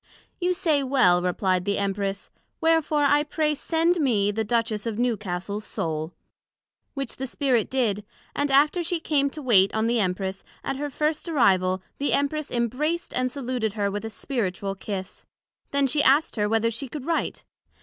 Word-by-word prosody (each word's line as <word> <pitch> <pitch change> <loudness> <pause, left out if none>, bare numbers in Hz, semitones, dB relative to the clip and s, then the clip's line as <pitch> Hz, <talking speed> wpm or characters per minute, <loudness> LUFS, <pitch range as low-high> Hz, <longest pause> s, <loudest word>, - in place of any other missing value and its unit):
You 360 0 +1
say 315 -6 +2
well, 255 -10 +4
replied 180 0 0
the 200 +1 0
Empress; 200 0 -2 0.3
wherefore 320 -2 +2
I 290 +1 +4
pray 300 0 0
send 330 +4 +1
me 215 -8 +2
the 220 +2 -1
Duchess 225 -1 -1
of 220 -2 -3
Newcastle's 210 -4 -2
Soul; 160 -4 -3 0.8
which 275 -3 -4
the 265 - -3
Spirit 255 -4 +1
did; 220 -6 0 0.3
and 285 0 0
after 295 +6 +4
she 340 +1 0
came 285 -3 +1
to 300 +1 -8
wait 200 -6 +5
on 220 0 +1
the 235 +1 +2
Empress, 190 0 -2 0.2
at 270 - -2
her 290 +1 -3
first 305 +4 -1
arrival 185 - +2 0.2
the 285 - +1
Empress 285 +1 0
imbraced 260 +9 -1
and 255 0 +1
saluted 250 -5 -2
her 205 -2 -1
with 205 +1 -4
a 225 - -4
Spiritual 200 -5 -3
kiss; 195 -1 -6 0.4
then 280 0 +2
she 290 +3 +2
asked 290 +3 +3
her 210 -2 0
whether 225 +1 +2
she 250 +5 -4
could 275 +1 -7
write? 330 0 -1
245 Hz, 170 wpm, -25 LUFS, 200-290 Hz, 0.8 s, wait